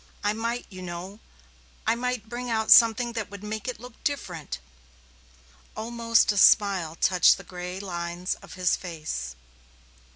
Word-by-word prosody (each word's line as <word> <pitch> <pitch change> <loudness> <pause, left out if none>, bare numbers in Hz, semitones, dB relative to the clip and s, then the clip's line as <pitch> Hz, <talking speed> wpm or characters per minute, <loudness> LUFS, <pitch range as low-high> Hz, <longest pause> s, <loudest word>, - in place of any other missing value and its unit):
I 205 0 +2
might, 230 +2 -3
you 185 -1 -9
know 180 +3 -7 0.7
I 225 - +3
might 245 -2 -3
bring 245 +2 -5
out 220 -1 0
something 235 +1 +6
that 225 -3 -4
would 200 0 -10
make 215 +1 -5
it 250 - -4
look 245 0 -13
different." 180 - -3 1.2
Almost 230 0 +2
a 205 - -3
smile 190 -7 +4
touched 180 0 +4
the - - -11
gray 180 0 -7
lines 175 -1 -3
of - - -12
his 180 -1 +2
face. 150 - -5
205 Hz, 150 wpm, -26 LUFS, 180-230 Hz, 1.2 s, something